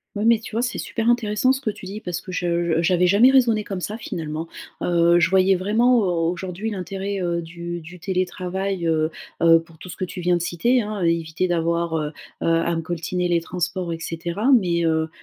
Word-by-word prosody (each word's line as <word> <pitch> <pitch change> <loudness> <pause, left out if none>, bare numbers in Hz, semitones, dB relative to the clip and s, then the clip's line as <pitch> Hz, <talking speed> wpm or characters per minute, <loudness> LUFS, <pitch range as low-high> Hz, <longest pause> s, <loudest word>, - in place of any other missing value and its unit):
Ouais, 205 +1 -1
mais 230 0 +6
tu 225 - -10
vois 230 - +1
c'est 250 - -2
super 230 0 -1
intéressant 240 +1 +2
ce 265 - 0
que 230 -6 -2
tu 190 - -10
dis 205 +2 -6
parce 180 -5 -4
que 185 - -9
je 170 -2 0
je 165 - +2
j'avais 180 +1 +3
jamais 215 +8 +6
raisonné 235 -5 +3
comme 195 -3 -5
ça 210 +4 -4
finalement. 160 -6 -5 0.4
Heu, 170 0 +4
je 165 - +4
voyais 190 0 +4
vraiment 220 +7 +3
au 175 -5 +1
aujourd'hui 185 +4 -4
l'intérêt, 195 0 -4
heu, 170 -1 -1
du 170 +1 -6
du 175 +3 -12
télétravail, 185 0 -2
heu 155 -1 +2 0.3
heu, 165 0 +7
pour 165 -1 -16
tout 185 - -10
ce - - -7
que 185 - -2
tu 180 - -7
viens 175 0 +2
de - - -4
citer 225 +9 +1
hein, 210 -1 -4
éviter 165 +1 0
d'avoir, 170 -1 0
heu 150 -1 -2 0.3
heu, - - -1
à 165 0 +2
me 165 - -1
coltiner 175 +2 -2
les 170 -1 +2
transports 180 +1 -3
et 165 - -3
cetera. 170 +9 -1
Mais, 175 -9 +3
heu, 160 0 +1
180 Hz, 220 wpm, -22 LUFS, 170-200 Hz, 0.4 s, heu